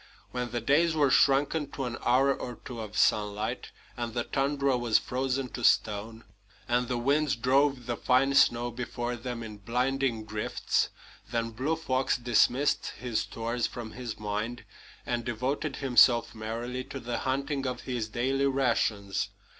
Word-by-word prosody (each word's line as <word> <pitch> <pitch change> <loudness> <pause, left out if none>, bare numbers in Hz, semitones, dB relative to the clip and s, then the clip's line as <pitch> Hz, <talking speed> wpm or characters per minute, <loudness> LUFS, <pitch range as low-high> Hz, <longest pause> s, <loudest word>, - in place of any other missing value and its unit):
When 125 -1 -3
the 120 0 -3
days 160 +7 +3
were 145 -4 +3
shrunken 140 +2 +3
to 135 - -3
an 120 -1 -3
hour 135 +3 +4
or 125 -2 -6
two 120 -2 -6
of 105 -1 -7
sunlight, 105 +3 +1 0.3
and 120 -2 -4
the 120 - 0
tundra 140 0 +1
was 120 -3 +3
frozen 130 +1 -1
to 120 - -7
stone, 110 +2 +1 0.4
and 120 0 +1
the 125 0 -1
winds 140 +4 +2
drove 130 +1 +2
the 120 - -2
fine 135 +2 +3
snow 120 -2 +4
before 120 0 -4
them 120 -1 -5
in 110 -2 -8
blinding 125 +1 -1
drifts, 110 -1 -1 0.4
then 115 -1 -1
Blue 135 +8 -1
Fox 135 -5 0
dismissed 125 +3 +2
his 120 -3 -1
stores 115 +2 -2
from 115 -2 -7
his 120 -3 -6
mind 105 +3 -3 0.4
and 120 -1 -1
devoted 130 +5 -2
himself 125 -3 +4
merrily 115 +3 -4
to 135 - -7
the 120 -1 -3
hunting 135 +1 -1
of 125 -1 -3
his 120 -4 -3
daily 135 +4 +1
rations. 115 -7 0
125 Hz, 155 wpm, -29 LUFS, 115-135 Hz, 0.4 s, hour